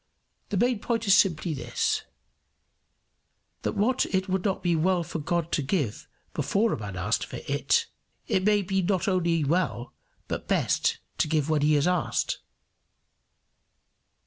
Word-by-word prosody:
The 205 Hz, -, -1 dB
main 240 Hz, +2 st, +2 dB
point 230 Hz, +1 st, -1 dB
is 195 Hz, -, +5 dB
simply 175 Hz, -4 st, +3 dB
this, 135 Hz, -, -1 dB, 1.6 s
that -, -, -2 dB
what 245 Hz, +6 st, +2 dB
it 190 Hz, 0 st, 0 dB
would 190 Hz, -1 st, -1 dB
not 195 Hz, -2 st, -1 dB
be 175 Hz, -2 st, +2 dB
well 175 Hz, +2 st, +2 dB
for 165 Hz, 0 st, -5 dB
God 170 Hz, +2 st, -1 dB
to -, -, +1 dB
give 140 Hz, -, -2 dB, 0.3 s
before 220 Hz, +2 st, +1 dB
a -, -, -3 dB
man 100 Hz, -3 st, -6 dB
had 90 Hz, 0 st, -3 dB
asked -, -, +1 dB
for -, -, -6 dB
it, -, -, +2 dB, 0.4 s
it 185 Hz, -, +1 dB
may 205 Hz, 0 st, +3 dB
be 190 Hz, +1 st, 0 dB
not 185 Hz, +2 st, 0 dB
only 170 Hz, -4 st, +2 dB
well, 150 Hz, -5 st, -1 dB, 0.3 s
but -, -, -4 dB
best, -, -, +1 dB, 0.2 s
to -, -, +3 dB
give 155 Hz, -1 st, +1 dB
when 155 Hz, -2 st, +2 dB
he 150 Hz, +1 st, +4 dB
has 145 Hz, -, +2 dB
asked. 180 Hz, -2 st, 0 dB
175 Hz, 160 wpm, -27 LUFS, 155-195 Hz, 1.6 s, is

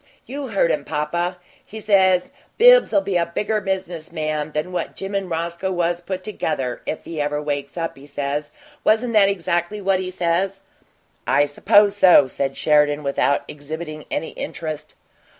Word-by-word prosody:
You 280 Hz, +1 st, -5 dB
heard 195 Hz, -7 st, +2 dB
him, 150 Hz, -, -1 dB
papa; 170 Hz, +5 st, -2 dB, 0.3 s
he 220 Hz, -, -9 dB
says, 190 Hz, -4 st, +3 dB, 0.3 s
'Bibbs'll -, -, +6 dB
be 195 Hz, -10 st, 0 dB
a 170 Hz, -, +2 dB
bigger 210 Hz, +5 st, -1 dB
business 185 Hz, -5 st, -4 dB
man 155 Hz, -2 st, -2 dB
than 155 Hz, +4 st, -2 dB
what 180 Hz, -, -3 dB
Jim 195 Hz, +1 st, -6 dB
and 195 Hz, -2 st, -2 dB
Roscoe 170 Hz, +3 st, -2 dB
was 175 Hz, -1 st, 0 dB
put 185 Hz, +1 st, -5 dB
together 130 Hz, -, -3 dB
if 155 Hz, -, -4 dB
he 160 Hz, -3 st, -4 dB
ever 150 Hz, 0 st, -1 dB
wakes 145 Hz, 0 st, -4 dB
up,' 165 Hz, -1 st, -3 dB
he 140 Hz, +1 st, -14 dB
says. 145 Hz, +1 st, -3 dB, 0.3 s
Wasn't 230 Hz, +2 st, +2 dB
that 200 Hz, -2 st, +5 dB
exactly 175 Hz, +1 st, -1 dB
what 195 Hz, -1 st, +1 dB
he 185 Hz, -1 st, -3 dB
says?" 185 Hz, +2 st, -1 dB, 0.7 s
"I 145 Hz, -, +4 dB
suppose 200 Hz, +8 st, +4 dB
so," 185 Hz, -7 st, +7 dB
said 135 Hz, +1 st, -3 dB
Sheridan, 150 Hz, -1 st, +3 dB
without 140 Hz, 0 st, +1 dB
exhibiting 155 Hz, +1 st, -7 dB
any 160 Hz, -, -2 dB
interest. 155 Hz, -2 st, -6 dB
170 Hz, 165 wpm, -21 LUFS, 150-195 Hz, 0.7 s, so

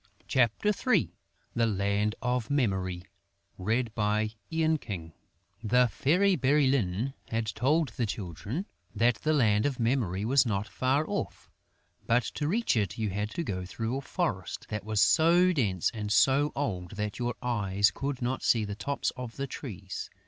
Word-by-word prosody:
CHAPTER 125 Hz, -, +2 dB, 0.2 s
III 90 Hz, -, +3 dB, 0.4 s
THE 115 Hz, -1 st, +2 dB
LAND 100 Hz, +1 st, 0 dB
OF 125 Hz, -2 st, 0 dB
MEMORY 95 Hz, -10 st, 0 dB, 0.6 s
The 110 Hz, 0 st, 0 dB, 1.6 s
Fairy 185 Hz, -, +3 dB
Bérylune 135 Hz, -5 st, +2 dB
had 115 Hz, 0 st, -1 dB
told 140 Hz, +7 st, +1 dB
the 115 Hz, 0 st, -2 dB
Children 105 Hz, -, -4 dB, 0.3 s
that 115 Hz, +2 st, +3 dB
the 155 Hz, +6 st, 0 dB
Land 110 Hz, -5 st, +3 dB
of 135 Hz, -3 st, -4 dB
Memory 115 Hz, -5 st, 0 dB
was 135 Hz, +4 st, +5 dB
not 105 Hz, -3 st, -1 dB
far 135 Hz, +4 st, 0 dB
off; -, -, -4 dB, 0.6 s
but 120 Hz, +1 st, +3 dB
to 145 Hz, +5 st, -3 dB
reach 225 Hz, -, +1 dB
it 105 Hz, -5 st, 0 dB
you 110 Hz, -3 st, -1 dB
had 105 Hz, +2 st, -2 dB
to 170 Hz, -, -1 dB
go 95 Hz, -, -3 dB
through 115 Hz, +6 st, -3 dB
a -, -, -4 dB
forest 130 Hz, -, -3 dB
that 105 Hz, -1 st, -3 dB
was 110 Hz, 0 st, -1 dB
so 175 Hz, -, +5 dB
dense 100 Hz, -, +1 dB
and 105 Hz, -2 st, -4 dB
so 140 Hz, +6 st, +4 dB
old 95 Hz, -10 st, -3 dB
that 105 Hz, +2 st, -3 dB
your 120 Hz, 0 st, -1 dB
eyes 100 Hz, -4 st, +2 dB
could 135 Hz, -2 st, -4 dB
not 130 Hz, +2 st, -1 dB
see 110 Hz, -3 st, +2 dB
the 100 Hz, -, -4 dB
tops 140 Hz, +7 st, -2 dB
of 125 Hz, -2 st, -7 dB
the 140 Hz, -, -3 dB
trees. 100 Hz, -, -7 dB
115 Hz, 150 wpm, -29 LUFS, 105-135 Hz, 1.6 s, was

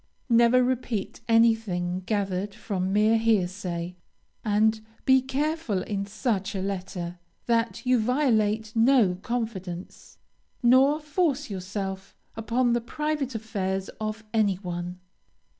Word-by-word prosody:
Never 235 Hz, +2 st, +5 dB
repeat 245 Hz, -5 st, -2 dB
anything 225 Hz, -6 st, +2 dB
gathered 200 Hz, -1 st, -1 dB
from 190 Hz, -2 st, -2 dB
mere 215 Hz, +2 st, +4 dB
hearsay, 180 Hz, -5 st, -1 dB, 0.5 s
and 220 Hz, +1 st, +2 dB, 0.2 s
be 265 Hz, 0 st, +6 dB
careful, 265 Hz, -, -1 dB
in 200 Hz, -1 st, -3 dB
such 205 Hz, -2 st, -2 dB
a -, -, -1 dB
letter, 180 Hz, -2 st, -4 dB, 0.3 s
that 230 Hz, +1 st, 0 dB
you 250 Hz, -1 st, +4 dB
violate 220 Hz, -4 st, +1 dB
no 230 Hz, -4 st, +5 dB
confidence, 195 Hz, -7 st, -5 dB, 0.5 s
nor 265 Hz, +5 st, +5 dB
force 300 Hz, -, -1 dB
yourself 190 Hz, 0 st, -5 dB, 0.2 s
upon 235 Hz, +2 st, +1 dB
the 240 Hz, -, +1 dB
private 295 Hz, +1 st, -2 dB
affairs 195 Hz, -4 st, -2 dB
of 215 Hz, +1 st, -3 dB
any 210 Hz, -4 st, +3 dB
one. 175 Hz, -1 st, -5 dB
220 Hz, 110 wpm, -26 LUFS, 190-245 Hz, 0.5 s, be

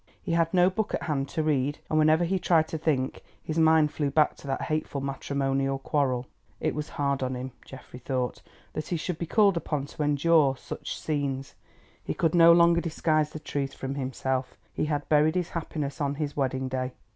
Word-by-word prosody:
He -, -, -5 dB
had 165 Hz, 0 st, +2 dB
no 180 Hz, 0 st, +4 dB
book 215 Hz, +3 st, -1 dB
at -, -, -4 dB
hand 140 Hz, -3 st, -1 dB
to 160 Hz, -, -1 dB
read, 145 Hz, -1 st, +1 dB
and 155 Hz, -, +1 dB
whenever 155 Hz, +2 st, +4 dB
he 185 Hz, +2 st, 0 dB
tried 165 Hz, -3 st, +3 dB
to 160 Hz, -, -3 dB
think 140 Hz, -5 st, -1 dB, 0.2 s
his 160 Hz, +1 st, -2 dB
mind 160 Hz, -2 st, +5 dB
flew 145 Hz, -2 st, 0 dB
back 150 Hz, +2 st, +3 dB
to -, -, -12 dB
that 135 Hz, -, -2 dB
hateful 155 Hz, -2 st, -2 dB
matrimonial 135 Hz, 0 st, -1 dB
quarrel. 135 Hz, -3 st, 0 dB, 0.3 s
It -, -, 0 dB
was 150 Hz, 0 st, -4 dB
hard 140 Hz, -2 st, 0 dB
on 130 Hz, 0 st, -1 dB
him, 130 Hz, +1 st, -5 dB
Geoffrey 130 Hz, -1 st, -11 dB
thought, 125 Hz, -1 st, -2 dB, 0.3 s
that 155 Hz, -, -4 dB
he 175 Hz, -, -1 dB
should 165 Hz, +1 st, -4 dB
be 170 Hz, -, -3 dB
called 200 Hz, -1 st, +4 dB
upon 150 Hz, -4 st, -2 dB
to 145 Hz, -, -8 dB
endure 145 Hz, -1 st, +3 dB
such -, -, -6 dB
scenes. 140 Hz, -3 st, -2 dB, 0.5 s
He -, -, -3 dB
could 165 Hz, -2 st, +1 dB
no 170 Hz, -1 st, +8 dB
longer 170 Hz, 0 st, +5 dB
disguise 155 Hz, -2 st, +1 dB
the 155 Hz, -, -8 dB
truth 140 Hz, -2 st, -3 dB
from 135 Hz, 0 st, -4 dB
himself—he 130 Hz, 0 st, -3 dB
had 145 Hz, -1 st, -2 dB
buried 155 Hz, +2 st, +3 dB
his 180 Hz, -2 st, -1 dB
happiness 155 Hz, -3 st, -4 dB
on 140 Hz, 0 st, 0 dB
his 150 Hz, -1 st, -3 dB
wedding 130 Hz, -1 st, -1 dB
day. 130 Hz, 0 st, -3 dB
150 Hz, 200 wpm, -27 LUFS, 135-160 Hz, 0.5 s, no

